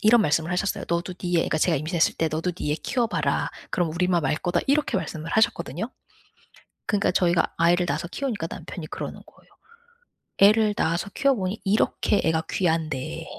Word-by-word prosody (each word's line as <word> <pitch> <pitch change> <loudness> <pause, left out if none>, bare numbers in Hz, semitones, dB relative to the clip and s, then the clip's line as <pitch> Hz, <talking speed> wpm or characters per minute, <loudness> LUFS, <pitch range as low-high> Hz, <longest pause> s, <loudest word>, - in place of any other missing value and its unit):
이런 225 +2 +6
말씀을 165 -2 +1
하셨어요. 180 +2 -1
"너도 170 +2 -1
네 175 -2 0
애가" 155 - -1
제가 170 -4 +3
임신했을 160 +3 +1
때 160 - +1
"너도 160 +4 -1
네 150 -4 -2
애 - - +1
키워봐라. 235 - -1 0.2
그럼 175 -3 0
우리 180 +1 +1
마음 175 -4 +2
알 135 - +2
거다." 175 +2 0
이렇게 290 +2 +2
말씀을 160 0 -4
하셨거든요. 220 +4 0 1.0
그러니까 205 -1 +1
저희가 175 -1 +2
아이를 175 +2 +3
낳아서 150 +4 -2
키우니까 230 -11 -3
남편이 165 -5 -7
그러는 - - -6
거예요. - - -22 0.9
"애를 210 +1 +5
낳아서 170 +4 0
키워 275 0 +3
보니 190 0 -3
이렇게 205 0 +2
애가 160 0 +1
귀한데" 155 - -1
175 Hz, 410 characters per minute, -25 LUFS, 160-200 Hz, 1.0 s, 이런